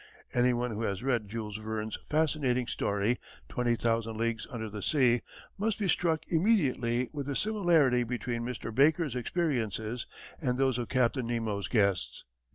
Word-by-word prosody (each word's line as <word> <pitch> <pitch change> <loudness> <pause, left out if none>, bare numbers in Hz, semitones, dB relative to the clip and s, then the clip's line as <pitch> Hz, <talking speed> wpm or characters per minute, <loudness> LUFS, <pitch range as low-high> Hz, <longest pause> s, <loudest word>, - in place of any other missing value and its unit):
Any 125 +1 +4
one 120 0 -1
who 110 +1 -4
has 100 -1 -2
read 120 -6 0
Jules 110 -1 -4
Verne's 110 0 -3
fascinating 145 -5 +1
story 100 +2 0 0.3
Twenty 120 -1 +1
Thousand 115 -1 0
Leagues 115 0 -1
under 110 -2 -4
the 105 0 -6
Sea 125 +1 +3 0.4
must 215 +1 0
be 205 - -1
struck 165 -3 +2
immediately 135 - +2
with 145 -2 -4
the 140 - -2
similarity 170 - +3
between 120 0 -3
Mr. 115 -2 -4
Baker's 145 +2 +3
experiences 120 - -1 0.3
and 125 -4 0
those 130 -2 +2
of 120 - -4
Captain 125 -1 +1
Nemo's 110 -4 -1
guests. 100 -5 +1
120 Hz, 155 wpm, -30 LUFS, 115-140 Hz, 0.4 s, Any